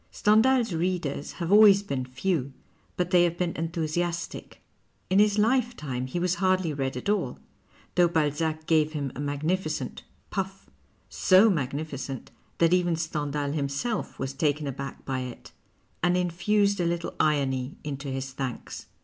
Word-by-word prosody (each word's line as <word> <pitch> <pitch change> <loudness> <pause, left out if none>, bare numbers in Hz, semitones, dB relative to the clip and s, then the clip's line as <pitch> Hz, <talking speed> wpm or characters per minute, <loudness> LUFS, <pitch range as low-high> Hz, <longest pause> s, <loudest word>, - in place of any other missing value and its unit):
Stcndiial's 225 +1 +3
readers 165 -4 -2
have 170 0 -4
always 205 -1 +7
been 135 -9 -3
few, 135 +1 -1 0.4
but 180 0 -1
they 175 -2 +6
have 170 0 0
been 175 -1 -1
enthusi 165 0 -2
astic. 175 0 -4 0.6
In 190 - +5
his 210 0 +4
lifetime 215 - 0
he 130 - -4
was 180 0 0
hardly 185 -4 +2
read 135 -2 -2
at 125 - -6
all, 210 0 0 0.6
though 175 -1 +5
Balzac 155 0 0
gave 155 -1 +2
him 140 -3 -3
a - - -7
magnilicent 155 0 -2 0.2
" - - -38
puff 195 0 -4
" - - -37
— - - -39 0.2
so 195 +4 +7
magnificent 140 -3 -4 0.3
that 170 +1 +4
even 175 -2 +2
Stendiuil 145 -3 -2
himself 145 +10 -2
was 135 0 -3
taken 150 +1 0
aback 140 0 -6
by 130 -1 -2
it 125 -2 -8 0.5
and 175 +1 +3
infused 200 +3 +1
a - - +1
little 170 0 -2
irony 135 -3 +1
into 140 -1 -5
his 135 0 -4
thanks. 130 -2 -6
160 Hz, 160 wpm, -27 LUFS, 140-185 Hz, 0.6 s, always